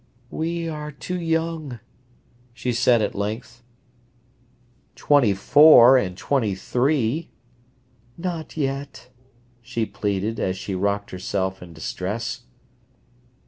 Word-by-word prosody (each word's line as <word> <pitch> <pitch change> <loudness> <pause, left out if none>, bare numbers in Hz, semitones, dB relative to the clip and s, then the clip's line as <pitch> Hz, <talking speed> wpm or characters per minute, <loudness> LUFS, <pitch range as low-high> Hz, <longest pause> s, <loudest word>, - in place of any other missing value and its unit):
"We 165 +1 -2
are 150 -1 -5
too 180 +5 -5
young," 165 -5 -2 0.8
she 125 0 -2
said 120 -1 +3
at 105 - -2
length. 110 +4 -5 1.3
"Twenty 130 -9 +3
four 135 +3 +7
and 95 -8 0
twenty 115 -7 0
three—" 130 - 0 0.9
"Not 170 -2 -5
yet," 140 -2 -4 0.5
she 115 -1 -3
pleaded, 105 +1 -2
as 95 0 -1
she 95 - -5
rocked 100 +2 -1
herself 95 +1 -3
in 90 -1 -11
distress. 95 +8 -4
120 Hz, 100 wpm, -23 LUFS, 100-150 Hz, 1.3 s, four